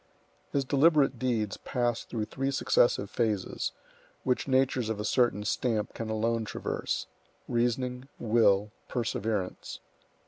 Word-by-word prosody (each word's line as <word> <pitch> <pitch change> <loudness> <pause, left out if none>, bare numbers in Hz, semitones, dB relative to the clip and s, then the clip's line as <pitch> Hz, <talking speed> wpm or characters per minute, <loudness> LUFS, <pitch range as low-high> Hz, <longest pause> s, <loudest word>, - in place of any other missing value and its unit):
His 140 -1 +1
deliberate 140 -2 +4
deeds 115 -5 0
passed 120 -2 -1
through 110 -3 -2
three 135 +4 -2
successive 120 -6 +3
phases, 105 -3 -1 0.5
which 125 +1 0
natures 130 -3 +2
of 110 -2 -2
a 105 - -2
certain 115 -3 +2
stamp 110 0 0
can 115 -1 -5
alone 115 +1 0
traverse,—reasoning, 125 +3 -3
will, 105 -3 +3 0.2
perseverance. 110 -5 -2
120 Hz, 110 wpm, -29 LUFS, 110-130 Hz, 0.5 s, deliberate